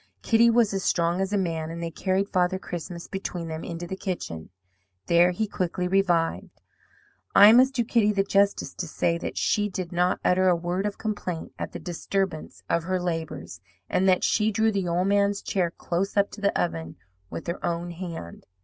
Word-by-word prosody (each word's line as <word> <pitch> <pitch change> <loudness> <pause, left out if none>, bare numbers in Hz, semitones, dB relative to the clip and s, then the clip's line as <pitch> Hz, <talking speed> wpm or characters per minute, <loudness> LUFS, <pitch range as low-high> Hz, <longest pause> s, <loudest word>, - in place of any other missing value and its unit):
Kitty 230 0 +5
was 230 -3 +3
as 195 -1 -2
strong 170 +2 +1
as 195 0 -1
a 205 - +1
man; 165 -4 -2
and 165 +1 -6
they 165 - -3
carried 190 +3 0
Father 185 -1 +1
Christmas 175 -1 -7
between 180 -3 -5
them 160 0 -5
into 170 0 -5
the 190 - -5
kitchen. 175 - -5 0.6
There 170 +1 +5
he 180 +5 -1
quickly 180 -2 -2
revived. 180 -3 0 0.8
"I 205 +1 +10
must 260 +3 +5
do 240 - +2
Kitty 220 -2 +2
the 195 -1 +1
justice 200 0 +1
to 175 - -5
say 170 +2 0
that - - -5
she 210 0 +1
did 185 -2 -5
not 180 +1 +1
utter 185 +1 +3
a 180 - +4
word 175 +4 -2
of 205 - -5
complaint 205 -6 -4
at - - -4
the - - -4
disturbance 180 -1 -3
of 170 0 0
her 185 0 0
labours; 160 - -4 0.3
and 190 +1 +3
that 185 - +3
she 215 0 +2
drew 220 +1 +2
the 195 -3 -1
old 175 +2 +1
man's 200 0 +2
chair 180 -3 0
close 180 +4 -3
up 200 0 +3
to 210 - -10
the 200 - +1
oven 80 - -2 0.3
with - - -6
her 170 - -4
own 170 +1 -2
hand. 170 - -8
180 Hz, 195 wpm, -26 LUFS, 170-200 Hz, 0.8 s, I